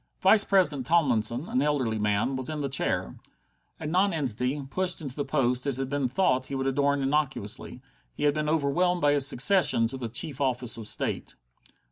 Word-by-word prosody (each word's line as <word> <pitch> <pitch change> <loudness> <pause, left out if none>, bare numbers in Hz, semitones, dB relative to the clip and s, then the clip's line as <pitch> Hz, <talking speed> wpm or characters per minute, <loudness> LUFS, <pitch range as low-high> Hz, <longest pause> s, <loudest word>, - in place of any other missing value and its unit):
Vice 205 +2 +5
president 150 -10 +1
Tomlinson, 130 -4 +1
an 130 - 0
elderly 135 -7 0
man, 105 +5 0
was 130 +1 -3
in 155 -1 -4
the 140 - -2
chair. 135 - -2 0.6
A 160 - -7
non 185 +5 +1
entity, 135 -1 -3
pushed 180 +5 -1
into 145 -2 -6
a - - 0
post 125 -3 0
it 135 -3 -2
had 135 -1 -3
been 140 -2 -1
thought 130 -3 0
he 140 - -5
would 135 0 -2
adorn 140 +1 +1
innocuously, 135 -4 -2 0.3
he - - -5
had 145 -1 +3
been 150 0 -2
overwhelmed 165 +4 +1
by 145 - +3
his 140 -2 +4
succession 140 -3 +4
to 135 - -6
the 120 -3 -5
chief 135 +4 -3
office 125 -3 -1
of 115 -2 -7
State. - - -2
140 Hz, 190 wpm, -27 LUFS, 125-155 Hz, 0.6 s, Vice